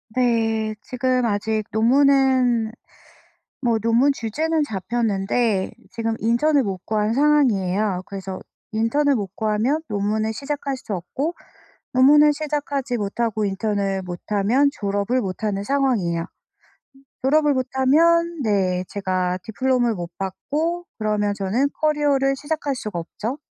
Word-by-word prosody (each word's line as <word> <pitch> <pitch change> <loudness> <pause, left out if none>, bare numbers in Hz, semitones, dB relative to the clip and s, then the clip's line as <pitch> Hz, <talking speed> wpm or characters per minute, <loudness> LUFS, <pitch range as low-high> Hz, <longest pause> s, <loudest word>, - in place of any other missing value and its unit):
네. 225 -3 +1
지금 255 0 0
아직 215 0 0
논문은 255 -1 +3 0.9
뭐 235 -4 +1
논문 230 +6 +3
주제는 305 +7 -1
잡혔는데 210 -2 0 0.2
지금 225 -1 -2
인턴을 270 +6 +2
못 195 -4 -3
구한 215 0 0
상황이에요. 215 -10 +2
그래서 190 -1 -6 0.3
인턴을 270 +6 +2
못 200 -3 -5
구하면 220 +8 0
논문을 215 +1 -1
시작할 280 +2 -3
수 255 -5 -8
없고, 270 - -3 0.6
논문을 295 +3 +6
시작하지 285 -4 -2
못하고 215 +1 -1
인턴을 195 -1 -1
못 175 -1 -6
하면 220 +8 +3
졸업을 205 +3 -1
못 190 +1 -5
하는 200 -2 -1
상황이에요. 205 -11 0 1.0
졸업을 295 +2 +3
못 255 -1 -1
하면 335 +5 +3
네, 190 -5 +1
제가 185 -2 -1
diploma를 245 0 0
못 175 -2 -5
받고 310 - -3
그러면 210 -1 0
저는 205 +8 0
커리어를 290 -3 +2
시작할 295 -1 -2
수가 210 -8 -4
없죠. 225 - -5
230 Hz, 290 characters per minute, -22 LUFS, 205-275 Hz, 1.0 s, 논문을